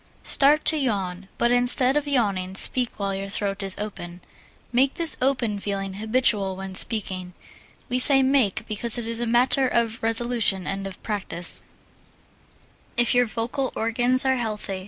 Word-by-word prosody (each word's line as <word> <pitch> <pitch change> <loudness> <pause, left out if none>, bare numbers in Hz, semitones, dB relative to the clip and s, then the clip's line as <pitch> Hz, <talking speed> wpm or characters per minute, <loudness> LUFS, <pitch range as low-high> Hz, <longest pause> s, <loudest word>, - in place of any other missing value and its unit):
Start 295 +2 +3
to 315 - +3
yawn, 195 -8 -3
but 235 - +1
instead 245 +2 +2
of 295 0 -1
yawning, 200 -9 -1
speak 250 +4 0
while 200 -1 -2
your 195 +1 -5
throat 200 0 -2
is 195 -1 0
open. 180 -4 -8 0.5
Make 265 +3 +2
this 330 -3 +5
open 245 -6 -1
feeling 195 -1 -4
habitual 210 -2 0
when 190 0 -8
speaking 185 -3 +1 0.5
we 250 - -1
say 270 +1 +5
make 255 -6 +1
because 230 +2 +4
it 235 -2 -5
is 230 0 -1
a 240 - -3
matter 250 +3 +2
of 230 -1 -2
resolution 225 -4 +1
and 195 0 -4
of 190 - -12
practise, 190 -5 -3 1.3
if 240 -1 +3
your 245 -1 +2
vocal 240 +4 -3
organs 245 +3 +1
are 265 0 +1
healthy. 210 -5 -4
225 Hz, 155 wpm, -23 LUFS, 195-250 Hz, 1.3 s, this